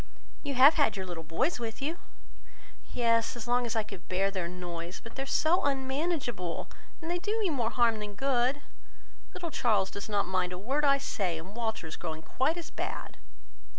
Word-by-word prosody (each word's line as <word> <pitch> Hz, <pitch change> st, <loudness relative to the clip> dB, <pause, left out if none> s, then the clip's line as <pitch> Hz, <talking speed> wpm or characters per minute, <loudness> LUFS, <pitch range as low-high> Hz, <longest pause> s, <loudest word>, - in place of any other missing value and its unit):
"You 285 Hz, -2 st, -3 dB
have 270 Hz, +5 st, +9 dB
had 225 Hz, -7 st, +3 dB
your 190 Hz, -, -3 dB
little 175 Hz, -3 st, -5 dB
boys 245 Hz, -, 0 dB
with 225 Hz, -2 st, -4 dB
you?" 315 Hz, +5 st, -2 dB, 0.9 s
"Yes, 230 Hz, -1 st, +2 dB
as 240 Hz, -1 st, -6 dB
long 245 Hz, 0 st, +2 dB
as 230 Hz, -, -2 dB
I 220 Hz, -, +2 dB
could 200 Hz, -4 st, -10 dB
bear 195 Hz, +2 st, +2 dB
their 185 Hz, -3 st, -2 dB
noise; 175 Hz, 0 st, -5 dB
but 230 Hz, -, -11 dB
they 270 Hz, -, -4 dB
are 270 Hz, -, -4 dB
so 325 Hz, +6 st, +3 dB
unmanageable 265 Hz, -, -1 dB, 0.3 s
that 325 Hz, -, -7 dB
they 350 Hz, +1 st, 0 dB
do 425 Hz, +5 st, -1 dB
me 395 Hz, -6 st, +2 dB
more 240 Hz, -6 st, +1 dB
harm 230 Hz, -1 st, +3 dB
than 205 Hz, -1 st, -6 dB
good. 265 Hz, +3 st, +2 dB, 0.7 s
Little 340 Hz, -2 st, -4 dB
Charles 210 Hz, -8 st, +2 dB
does 200 Hz, +1 st, -6 dB
not 205 Hz, -1 st, +2 dB
mind 185 Hz, -1 st, 0 dB
a -, -, -4 dB
word 265 Hz, +10 st, 0 dB
I 275 Hz, -1 st, +6 dB
say, 195 Hz, -, -1 dB
and 185 Hz, +6 st, -9 dB
Walter 220 Hz, -6 st, -2 dB
is 160 Hz, -, -6 dB
growing 160 Hz, -2 st, -5 dB
quite 265 Hz, -, +1 dB
as 340 Hz, -, -6 dB
bad." -, -, -5 dB
230 Hz, 200 wpm, -30 LUFS, 190-275 Hz, 0.9 s, have